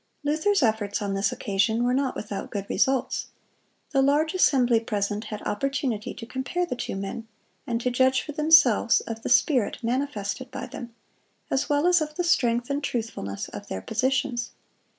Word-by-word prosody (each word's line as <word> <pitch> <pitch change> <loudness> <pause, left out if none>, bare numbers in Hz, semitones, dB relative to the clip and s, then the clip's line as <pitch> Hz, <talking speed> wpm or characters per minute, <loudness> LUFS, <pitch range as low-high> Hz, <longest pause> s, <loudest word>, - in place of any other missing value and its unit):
Luther's 310 +5 +2
efforts 215 -3 +1
on 200 -1 -2
this 195 0 +1
occasion 205 +4 0
were 245 +1 +2
not 265 0 0
without 205 -2 -5
good 200 -2 -4
results. 260 +4 0 0.6
The 275 -3 +3
large 295 +4 +2
assembly 250 -10 +4
present 210 -1 -2
had 210 0 -6
opportunity 255 -1 -2
to 230 - -8
compare 260 +9 -2
the 345 - -4
two 240 - -4
men, 195 +4 -5 0.4
and 230 -1 -1
to 250 - 0
judge 260 +1 +3
for 300 - -6
themselves 300 -7 +5
of 225 -1 -6
the - - -4
spirit 250 -2 +3
manifested 250 -1 -2
by 265 -1 -6
them, 240 -3 -9 0.6
as 280 +2 0
well 290 +2 +2
as 355 -2 +5
of 305 0 -3
the 355 - -1
strength 245 -6 +2
and 285 +1 -1
truthfulness 220 - -3
of - - -9
their 95 - -4
positions. 250 0 -1
245 Hz, 170 wpm, -26 LUFS, 220-280 Hz, 0.6 s, themselves